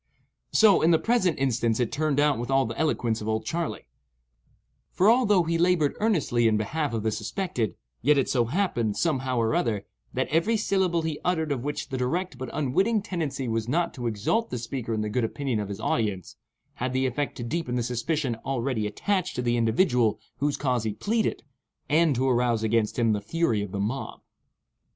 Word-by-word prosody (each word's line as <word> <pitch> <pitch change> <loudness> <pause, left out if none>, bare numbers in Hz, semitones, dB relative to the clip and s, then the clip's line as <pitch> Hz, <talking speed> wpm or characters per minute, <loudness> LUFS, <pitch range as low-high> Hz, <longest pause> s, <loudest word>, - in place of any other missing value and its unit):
So, 215 -3 +5
in 160 - +4
the 165 - +6
present 190 -3 +1
instance, 120 -4 +1
it 120 -3 0
turned 150 -1 0
out 145 -4 +3
with 120 - -4
all 135 0 +3
the 115 0 -5
eloquence 120 -8 0
of 105 - -5
"Old 110 0 -1
Charley"; 170 +6 -3 1.1
for, 190 - +2
although 210 -7 +4
he 165 0 -1
laboured 170 -4 +2
earnestly 155 - +2
in 110 -1 +3
behalf 145 +8 -1
of 110 - -2
the 110 - +1
suspected, 115 - -2 0.3
yet 145 +4 +4
it 135 - +2
so 120 -3 +2
happened, 120 - 0
somehow 130 -6 0
or 115 -1 +1
other, 105 -4 0 0.3
that 130 - 0
every 170 +9 +2
syllable 190 -5 +1
he 160 -2 -3
uttered 160 -4 0
of 130 -4 -2
which 145 +2 -4
the 130 -2 -3
direct 160 +3 -2
but 130 - -5
unwitting 195 - +1
tendency 150 - -3
was 115 -1 -1
not 170 +5 0
to 120 -3 -4
exalt 115 - 0
the 125 - -3
speaker 120 0 -4
in 110 -1 0
the 105 - -2
good 115 +3 -1
opinion 125 0 -2
of 105 -1 -4
his 100 - -5
audience, 105 -6 -1 0.5
had 130 0 -1
the 130 0 +1
effect 135 +3 -2
to 120 - -5
deepen 125 +1 -2
the 120 - 0
suspicion 125 +2 -1
already 130 -4 -1
attached 185 - -1
to 125 - -2
the 120 0 +1
individual 115 - +2 0.2
whose 145 0 0
cause 125 -5 0
he 110 -2 -2
pleaded, 220 - -1 0.4
and 155 -1 +3
to 130 +2 +1
arouse 120 -3 +2
against 110 -1 +1
him 115 -3 +3
the 105 - -1
fury 115 -2 0
of 100 -2 -5
the 100 - -4
mob. 115 +7 -3
130 Hz, 200 wpm, -26 LUFS, 115-165 Hz, 1.1 s, the